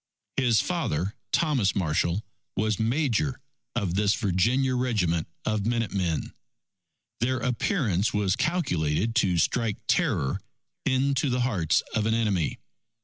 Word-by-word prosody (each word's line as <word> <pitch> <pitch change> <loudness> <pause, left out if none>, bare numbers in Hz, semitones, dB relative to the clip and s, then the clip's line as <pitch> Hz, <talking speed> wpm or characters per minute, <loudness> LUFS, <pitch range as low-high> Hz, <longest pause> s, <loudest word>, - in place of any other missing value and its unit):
His 120 -4 +3
father 100 - -1 0.2
Thomas 140 - +2
Marshall 85 +2 0 0.3
was 110 0 +1
Major 130 +2 +1 0.4
of 95 -4 0
this 100 +1 +2
Virginia 115 +8 +1
regiment 105 -11 0 0.2
of 110 -1 0
Minute 115 -3 0
Men. 85 -5 -1 0.9
Their 130 +3 +1
appearance 120 - 0
was 100 -2 +1
calculated 115 - 0
to 90 -3 +3
strike 110 +5 +1
terror 65 -1 +1 0.5
into 135 +2 +2
the 125 0 +1
hearts 105 - +2
of 110 0 +1
an 110 - +2
enemy. 105 -8 0
110 Hz, 120 wpm, -27 LUFS, 95-125 Hz, 0.9 s, His